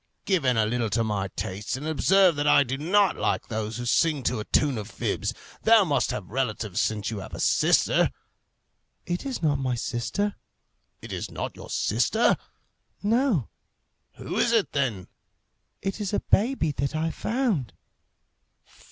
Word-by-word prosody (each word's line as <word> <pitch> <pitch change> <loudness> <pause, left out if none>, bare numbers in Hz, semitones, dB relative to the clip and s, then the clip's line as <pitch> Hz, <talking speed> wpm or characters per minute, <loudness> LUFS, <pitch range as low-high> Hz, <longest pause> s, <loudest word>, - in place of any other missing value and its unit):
"Give 185 -8 +1
in 125 -2 +3
a 110 - +3
little 115 0 -1
to 115 +3 +1
my 105 -3 -1
tastes, 100 +5 -4
and 145 - -7
observe 185 +3 +4
that 145 0 0
I 145 - +6
do 130 0 -3
not 190 +8 +2
like - - -1
those 110 -1 -3
who 120 - -5
sing 150 +3 +2
to 120 -1 0
a 105 - -5
tune 140 -6 +1
of 105 +1 -7
fibs. - - -2 0.3
Thou 225 -1 +6
must 150 -6 +1
have 100 -2 -5
relatives 110 -6 -1
since 110 0 -1
you 110 - -4
have 95 - -8
a - - -8
sister." - - +3 1.0
"It 175 +9 -3
is 260 -9 -4
not 145 -3 +2
my 130 -2 -1
sister." 130 - -2 0.7
"It - - -7
is - - -4
not - - -5
your - - -11
sister?" - - +2 0.7
"No." 220 - +2 0.7
"Who - - -4
is 235 - +3
it 225 -4 +2
then?" 120 -10 -1 0.8
"It 195 +2 -3
is 205 -1 -3
a - - +2
baby 215 - +2
that 140 +2 -2
I 160 +1 0
found." 225 - -1
140 Hz, 170 wpm, -26 LUFS, -, 1.0 s, I